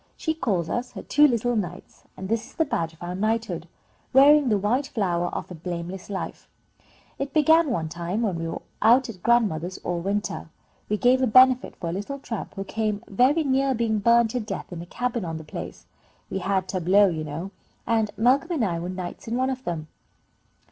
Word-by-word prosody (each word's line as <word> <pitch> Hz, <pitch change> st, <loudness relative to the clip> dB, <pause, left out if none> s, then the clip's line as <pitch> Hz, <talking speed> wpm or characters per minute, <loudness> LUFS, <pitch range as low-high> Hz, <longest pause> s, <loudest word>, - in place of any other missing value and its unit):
She 320 Hz, -, -1 dB
calls 200 Hz, -, -1 dB
us 245 Hz, +6 st, -3 dB
her -, -, -7 dB
two 295 Hz, +1 st, +5 dB
little 245 Hz, -1 st, 0 dB
knights, 180 Hz, -3 st, -5 dB
and 190 Hz, -, -6 dB
this 225 Hz, +2 st, -1 dB
is -, -, -18 dB
the 320 Hz, -, +2 dB
badge 165 Hz, -, -2 dB
of 160 Hz, -, -13 dB
our 175 Hz, +1 st, -4 dB
knighthood, 220 Hz, +4 st, -1 dB, 0.5 s
'wearing 280 Hz, +1 st, +7 dB
the 210 Hz, -, +3 dB
white 240 Hz, +8 st, 0 dB
flower 175 Hz, -5 st, 0 dB
of -, -, -5 dB
a -, -, -5 dB
blameless 175 Hz, +3 st, -6 dB
life,' 195 Hz, -, -5 dB, 0.7 s
It 275 Hz, +2 st, -4 dB
began 315 Hz, +1 st, +5 dB
one 165 Hz, -10 st, -1 dB
time 175 Hz, +7 st, -3 dB
when 195 Hz, -6 st, 0 dB
we 165 Hz, -, -3 dB
were 165 Hz, -, -5 dB, 0.2 s
out 245 Hz, +2 st, +5 dB
at 190 Hz, -6 st, -9 dB
grandmother's 190 Hz, -7 st, +1 dB
all 175 Hz, -1 st, -2 dB
winter. 200 Hz, +4 st, -3 dB, 0.4 s
We 210 Hz, -, +1 dB
gave 250 Hz, +4 st, +4 dB
a 260 Hz, -, +3 dB
benefit 255 Hz, +2 st, +5 dB
for 170 Hz, -, -6 dB
a -, -, -3 dB
little 205 Hz, +9 st, -4 dB
tramp, 235 Hz, -6 st, -6 dB
who 195 Hz, -, -3 dB
came 215 Hz, +1 st, -2 dB
very 260 Hz, +10 st, +3 dB
near 270 Hz, -1 st, +2 dB
being 220 Hz, -2 st, 0 dB
burned 235 Hz, +1 st, +4 dB
to 250 Hz, -, -1 dB
death 210 Hz, -4 st, -6 dB
in 170 Hz, -, -6 dB
a 175 Hz, -, -9 dB
cabin 245 Hz, +1 st, -2 dB
on 165 Hz, -2 st, -4 dB
the 160 Hz, -, -8 dB
place. 150 Hz, -, -8 dB, 0.5 s
We 190 Hz, -, -1 dB
had 190 Hz, 0 st, 0 dB
tableaux, 190 Hz, +2 st, +4 dB
you 160 Hz, -3 st, -3 dB
know, 160 Hz, +6 st, -5 dB, 0.3 s
and 220 Hz, -2 st, +1 dB
Malcolm 260 Hz, +8 st, +3 dB
and 270 Hz, -9 st, +1 dB
I 170 Hz, -3 st, -1 dB
were 175 Hz, +2 st, -4 dB
knights 185 Hz, +1 st, -6 dB
in 230 Hz, -, -2 dB
one 260 Hz, +1 st, +1 dB
of 260 Hz, 0 st, -6 dB
them." 155 Hz, -3 st, -3 dB
215 Hz, 210 wpm, -25 LUFS, 180-250 Hz, 0.7 s, wearing